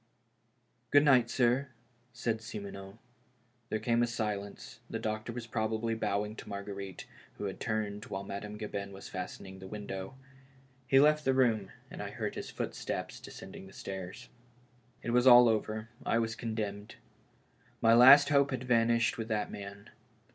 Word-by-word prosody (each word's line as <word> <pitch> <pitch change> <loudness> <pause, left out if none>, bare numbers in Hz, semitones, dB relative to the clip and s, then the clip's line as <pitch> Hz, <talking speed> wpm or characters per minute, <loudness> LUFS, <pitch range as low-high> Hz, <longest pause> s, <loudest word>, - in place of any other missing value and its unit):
" - - -43
Good 145 +1 +6
night, 125 -5 +5
sir," 125 +3 +2 0.4
said 115 -2 -2
Simoneau. 100 -2 -8 0.7
There 110 - 0
came 115 +2 +1
a 120 - +3
silence, 105 -3 -4
the - - -3
doctor 110 +2 -3
was 120 0 -6
probably 110 0 -1
bow 105 -2 0
ing 105 +1 -8
to - - -9
Marguerite, 100 -2 -6 0.3
who - - -6
had 95 -2 -4
turned 105 -2 -2
while 95 0 -5
Madame 105 +2 -6
Gabin 100 -2 -5
was 95 - -9
fastening 95 0 -7
the 95 - -9
window. 100 +2 -6 0.7
He 135 - +6
left 150 +1 +5
the 135 -1 +2
room, 115 -7 +2 0.2
and - - -7
I - - -4
heard - - -4
his - - -6
footsteps - - -4
descending 95 - -10
the 95 - -15
stairs. 95 +5 -7 0.8
It 120 - -2
was 125 +2 +4
all 120 -1 +10
over; 110 0 -1
I - - +1
was 115 -1 0
condemned. 105 -3 -4 0.8
My 115 0 +5
last 135 +5 +9
hope 140 -1 +4
had 130 -2 -3
vanished 115 -1 +2
with 115 - -3
that 110 -2 -1
man. 100 0 -9
110 Hz, 160 wpm, -31 LUFS, 100-120 Hz, 0.8 s, all